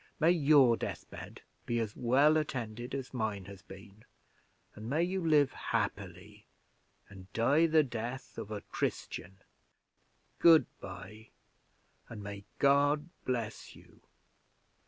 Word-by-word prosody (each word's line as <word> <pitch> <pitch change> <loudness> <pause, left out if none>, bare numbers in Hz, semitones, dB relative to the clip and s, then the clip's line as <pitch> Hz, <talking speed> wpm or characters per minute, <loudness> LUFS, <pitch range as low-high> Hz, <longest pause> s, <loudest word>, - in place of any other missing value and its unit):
May 165 +1 +5
your 140 -7 +5
death - - -5
bed - - -10 0.3
be 120 - 0
as 110 -2 -3
well 140 +6 +4
attended 120 -4 -3
as 135 -1 -6
mine 110 -5 -2
has 100 -1 -11
been, 100 +1 -14 0.7
and 110 +2 -8
may 155 +5 +1
you 185 +1 -2
live 150 -4 +3
happily, - - -4 0.6
and 95 -2 -14
die 145 +9 +3
the 155 -1 +4
death 120 0 -6
of - - -7
a 105 -2 -5
Christian! 95 +3 -4 1.0
Good 165 -2 +7
by, 95 +4 -10 0.8
and 105 -3 -8
may 100 0 -8
God 145 +3 +3 0.2
bless 115 -4 -4
you. - - -19
120 Hz, 125 wpm, -32 LUFS, 105-150 Hz, 1.0 s, Good